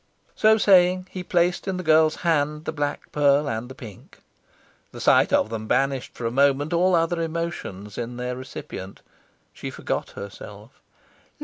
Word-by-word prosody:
So 220 0 +4
saying, 185 -2 +4
he 185 - -5
placed 175 +1 0
in 190 -1 -1
the 185 - -4
girl's 155 -1 +4
hand 150 -2 +1
the - - -2
black 145 -2 -4
pearl 145 0 +3
and 115 -1 -3
the 130 - -10
pink. 110 -10 -12 0.7
The - - -10
sight - - +4
of 110 - +2
them 110 -1 -5
banished 135 +1 0
for 120 - -6
a 115 - 0
moment 140 +4 +2
all 180 +2 +3
other 165 0 +1
emotions 165 - -5
in 120 +1 -5
their 125 0 -3
recipient. 130 -6 -9 0.5
She - - -6
forgot - - -4
herself. 100 +1 -10
145 Hz, 165 wpm, -24 LUFS, 125-170 Hz, 0.7 s, So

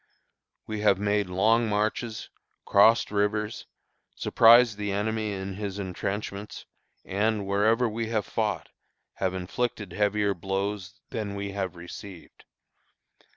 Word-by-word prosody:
We 110 -1 -4
have 105 -2 +4
made 100 -1 0
long 110 +5 +3
marches, 110 +2 -2 0.3
crossed 110 +3 +5
rivers, 105 +1 -1 0.5
surprised 115 -1 +6
the 105 -1 -2
enemy 110 +1 -1
in 95 0 -4
his 100 -2 -4
intrenchments, 100 +2 -4 0.4
and, 105 +1 0
wherever 110 +5 +2
we 115 +1 -3
have 110 -2 -1
fought, - - -2 0.5
have 95 -1 -1
inflicted 100 +1 -3
heavier 105 -1 +1
blows 100 +3 -3
than 105 -3 -3
we 100 0 -4
have 95 -2 -3
received. 90 +1 -11
105 Hz, 115 wpm, -27 LUFS, 100-110 Hz, 0.5 s, surprised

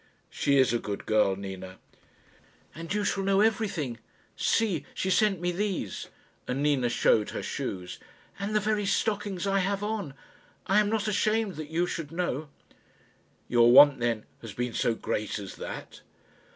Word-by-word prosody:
"She 140 -1 +2
is 130 -2 +4
a 120 - +1
good 100 -3 -5
girl, 105 -3 +3
Nina." 95 -1 -8 1.0
"And 165 +1 -8
you 210 0 0
shall 200 - 0
know 195 +1 +3
everything; 195 - 0 0.4
see 205 -9 +1
she 190 - -1
sent 195 -1 +3
me 175 +1 0
these," 195 +1 -3 0.4
and 135 +3 -1
Nina 140 -5 +2
showed 110 -2 +2
her - - -5
shoes; 90 -2 -5 0.4
"and 205 +2 -3
the - - +5
very 210 -1 0
stockings 205 -2 -1
I 195 0 +2
have 195 +2 -1
on; 205 -10 -3 0.5
I 200 +2 +4
am 210 -1 +2
not 220 -1 0
ashamed 215 0 +1
that 155 -1 -6
you 170 +2 +1
should 165 -4 -5
know." 160 -4 -2 1.0
"Your 120 -1 +5
want, 140 +1 +8
then, 115 -2 -1 0.2
has 115 -4 -8
been 120 +2 -3
so 115 - +1
great 110 -1 -3
as 100 -2 -8
that?" - - -8
165 Hz, 165 wpm, -28 LUFS, -, 1.0 s, want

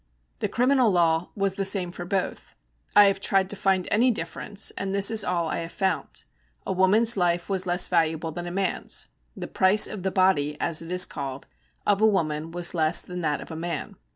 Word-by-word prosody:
The - - -2
criminal 255 0 +2
law 170 -1 +1
was 195 -1 0
the 195 - -3
same 190 -2 0
for 175 0 -8
both; 190 +1 -4 0.4
I 205 - +9
have 195 -1 +2
tried 195 -1 +1
to - - -5
find 190 -2 0
any 235 +4 +3
difference, 210 -2 -3
and 195 0 -4
this 200 +2 +4
is 220 -2 +4
all 175 -3 -1
I - - -3
have 165 0 -6
found: 190 -1 -3 0.4
A - - -3
woman's 210 +5 +3
life 175 0 0
was 190 -1 -2
less 175 0 +2
valuable 160 -2 0
than 175 +2 -7
a - - -5
man's. 190 0 -2 0.3
The - - -5
price 190 +3 +5
of 205 - -5
the 190 - -1
body, 170 -6 +1
as 160 - 0
it 165 - -9
is 180 0 +4
called, 135 -1 -7 0.4
of 205 0 +1
a 220 - +5
woman 160 -6 -1
was 175 +1 +2
less 160 -2 +3
than 180 0 -7
that 150 -3 -2
of - - -11
a - - -6
man. 165 -2 -5
185 Hz, 210 wpm, -24 LUFS, 170-195 Hz, 0.4 s, I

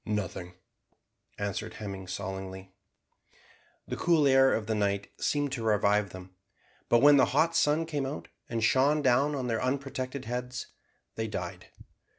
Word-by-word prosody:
"Nothing," 95 -4 -4 0.8
answered 100 -1 -4
Hemming 100 -3 -7
solemnly. 95 0 -6 1.1
The - - -3
cool 165 -4 +3
air 135 -1 +5
of 110 - 0
the 110 - -1
night 100 -1 -1
seemed 145 -1 0
to 125 -4 -3
revive 105 -1 +2
them; 95 0 -11 0.5
but 120 +1 +4
when 145 0 +8
the - - +6
hot 165 +2 +3
sun 160 0 +3
came 145 -4 -2
out, 145 - -6 0.2
and 115 -1 -2
shone 140 +6 +3
down 135 +3 +3
on 130 -2 -3
their 115 -2 -1
unprotected 130 0 -3
heads, 125 +2 -4 0.5
they 110 0 -3
died. 90 -3 -6
115 Hz, 150 wpm, -29 LUFS, 100-140 Hz, 1.1 s, when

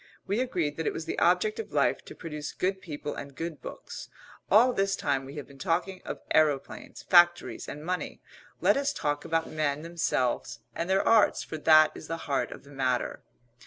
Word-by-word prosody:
We 200 +4 0
agreed 175 - -1
that 160 - -2
it - - 0
was 160 - -5
the - - -3
object 435 0 +2
of 450 - -6
life - - +2
to - - -10
produce 150 -3 -6
good 190 +1 -1
people 150 -3 -5
and 140 -1 -8
good 165 -1 -5
books. - - -8 0.4
All 240 +5 +6
this 195 -1 +1
time 135 -2 -1
we 135 +2 -10
have 145 - -7
been 140 -1 -16
talking 180 +5 -1
of - - -6
aeroplanes, 150 -3 0
factories, 175 -1 +4
and 150 +2 -7
money. 180 +1 -3 0.4
Let - - +4
us 280 0 0
talk 145 - -2
about 165 0 -1
men 150 -1 -1
themselves 160 -9 -1 0.2
and 170 +7 -3
their 190 +1 +2
arts, 225 -2 +4
for 155 - -6
that 155 0 +6
is - - -10
the 165 - -3
heart 140 -3 0
of - - -10
the 140 - -16
matter." 130 -3 -1
160 Hz, 200 wpm, -28 LUFS, 145-185 Hz, 0.4 s, All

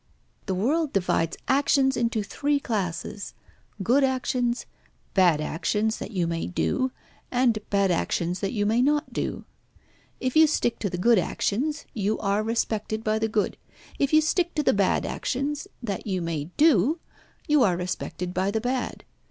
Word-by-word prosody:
The 190 - 0
world 285 - +1
divides 175 -4 +1
actions 270 -1 +3
into 230 -3 0
three 285 +7 0
classes: 200 -4 -3 0.5
good 255 +8 +4
actions, 255 -2 0 0.5
bad 180 -6 +4
actions 210 +8 -1
that - - -5
you 185 -5 -1
may 165 0 -2
do, 260 +8 0 0.4
and 245 -3 +2
bad 200 -2 +2
actions 175 +1 -1
that 195 - -2
you 205 -3 0
may 225 +3 +3
not 295 +3 +1
do. - - -3 0.7
If 255 -1 -2
you 315 0 +7
stick 240 -5 0
to 200 - -1
the 180 - -4
good 230 +3 +4
actions, 285 - -1
you 215 0 0
are 200 0 0
respected 220 -1 -1
by 215 0 +1
the 220 0 0
good. 215 -1 0 0.4
If 275 - +2
you 310 0 +6
stick 345 +3 0
to 300 - +1
the - - +4
bad 200 -2 +2
actions 285 +7 -2 0.2
that 205 -2 -4
you 190 -2 0
may 165 -4 -2
do, 300 - +4 0.5
you 300 -2 +4
are 185 -7 +3
respected 180 0 -4
by 185 +2 0
the 220 +2 0
bad. 250 +1 -2
220 Hz, 165 wpm, -26 LUFS, 195-265 Hz, 0.7 s, you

